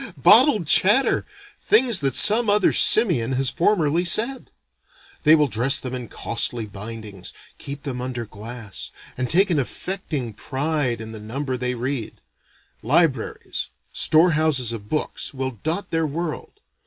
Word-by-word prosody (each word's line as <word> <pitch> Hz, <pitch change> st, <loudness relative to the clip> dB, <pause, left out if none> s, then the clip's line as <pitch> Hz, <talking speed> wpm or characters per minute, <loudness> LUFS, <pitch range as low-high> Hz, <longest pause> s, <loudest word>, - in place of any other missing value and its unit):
Bottled 220 Hz, -, +6 dB
chatter! 205 Hz, -, +3 dB, 0.3 s
things 250 Hz, -, +4 dB
that 135 Hz, -3 st, -1 dB
some 220 Hz, +1 st, +5 dB
other 205 Hz, 0 st, +3 dB
simian 150 Hz, -, +4 dB
has 130 Hz, 0 st, 0 dB
formerly 170 Hz, -3 st, +1 dB
said. 230 Hz, +9 st, 0 dB, 0.7 s
They 155 Hz, 0 st, +6 dB
will 150 Hz, -2 st, +2 dB
dress 130 Hz, +5 st, 0 dB
them 130 Hz, -2 st, -7 dB
in 125 Hz, -2 st, -6 dB
costly 115 Hz, 0 st, -3 dB
bindings, 105 Hz, -2 st, -9 dB, 0.3 s
keep 140 Hz, +1 st, -8 dB
them 125 Hz, -4 st, -5 dB
under 125 Hz, -2 st, -5 dB
glass, 110 Hz, 0 st, -8 dB, 0.3 s
and 125 Hz, -1 st, -3 dB
take 190 Hz, +4 st, +2 dB
an 155 Hz, -, +1 dB
affecting 145 Hz, -, -4 dB
pride 135 Hz, +1 st, -3 dB
in 110 Hz, 0 st, -8 dB
the 110 Hz, -, -9 dB
number 130 Hz, +5 st, -4 dB
they 125 Hz, 0 st, -3 dB
read. 125 Hz, -1 st, -5 dB, 0.6 s
Libraries 140 Hz, -1 st, -1 dB, 0.3 s
store 165 Hz, +3 st, +4 dB
houses 150 Hz, -6 st, +1 dB
of 105 Hz, -2 st, -9 dB
books, 155 Hz, -1 st, -4 dB
will 130 Hz, -4 st, -5 dB
dot 170 Hz, +5 st, -3 dB
their 165 Hz, -1 st, 0 dB
world. 170 Hz, -, -6 dB
140 Hz, 140 wpm, -22 LUFS, 120-170 Hz, 0.7 s, Bottled